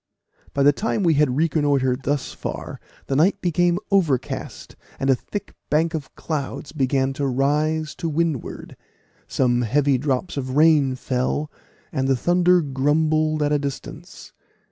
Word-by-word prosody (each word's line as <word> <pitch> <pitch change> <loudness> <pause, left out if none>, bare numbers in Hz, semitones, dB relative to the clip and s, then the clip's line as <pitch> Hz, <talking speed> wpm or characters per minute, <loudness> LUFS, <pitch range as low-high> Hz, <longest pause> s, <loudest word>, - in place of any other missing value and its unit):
By 140 - +2
the 145 +1 +6
time 210 +4 -1
we 165 -2 +4
had 145 -3 +2
reconnoitred 145 -5 +1
thus 145 0 -1
far - - -6 0.3
the 135 - -2
night 165 +8 +3
became 175 0 +1
overcast, 150 -11 -1 0.2
and 135 0 +2
a - - +4
thick 205 - -7 0.2
bank 160 +3 +2
of 155 -4 -6
clouds 145 -2 -4
began 135 -2 0
to 140 +1 -2
rise 150 +4 0
to 165 - -2
windward; 160 -3 -3 0.5
some 125 -2 +1
heavy 135 +3 +2
drops 140 +4 -2
of 130 0 -3
rain 150 -4 +4
fell, 130 +4 -2 0.4
and 135 -3 -1
the 135 - +3
thunder 175 +4 +3
grumbled 155 +2 +1
at 145 - +1
a 145 - +2
distance. 140 -1 -7
145 Hz, 145 wpm, -22 LUFS, 135-160 Hz, 0.5 s, the